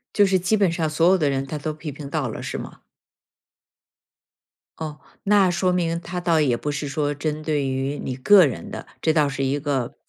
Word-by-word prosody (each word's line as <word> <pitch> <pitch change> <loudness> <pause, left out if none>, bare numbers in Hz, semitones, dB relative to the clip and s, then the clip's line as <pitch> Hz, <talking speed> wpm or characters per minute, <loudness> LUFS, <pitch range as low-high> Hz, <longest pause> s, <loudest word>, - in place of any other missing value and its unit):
就 205 - +6
是 190 -1 +3
基 190 +5 +1
本 195 -4 +3
上 165 -2 -1
所 165 +3 +2
有 190 +1 +5
的 150 -4 +1
人 135 0 -1
他 150 +3 -5
都 155 +1 -3
批 150 0 -7
评 140 0 -8
到 - - -1
了， - - -6
是 - - -4
吗？ - - -9 2.0
哦， 155 -2 -6 0.2
那 200 -2 +4
说 180 +1 +1
明 170 -2 0
他 180 +1 -5
倒 170 -2 +2
也 135 -6 +2
不 150 - -3
是 145 0 -3
说 145 +1 -1
针 155 +1 -3
对 145 -3 0
于 135 +2 -2
你 130 - -4
个 185 +7 +6
人 130 - -4
的， - - -7
这 160 - +2
倒 150 -2 +3
是 135 0 -3
一 140 +2 0
个 135 -4 -2
155 Hz, 230 characters per minute, -23 LUFS, 140-175 Hz, 2.0 s, 就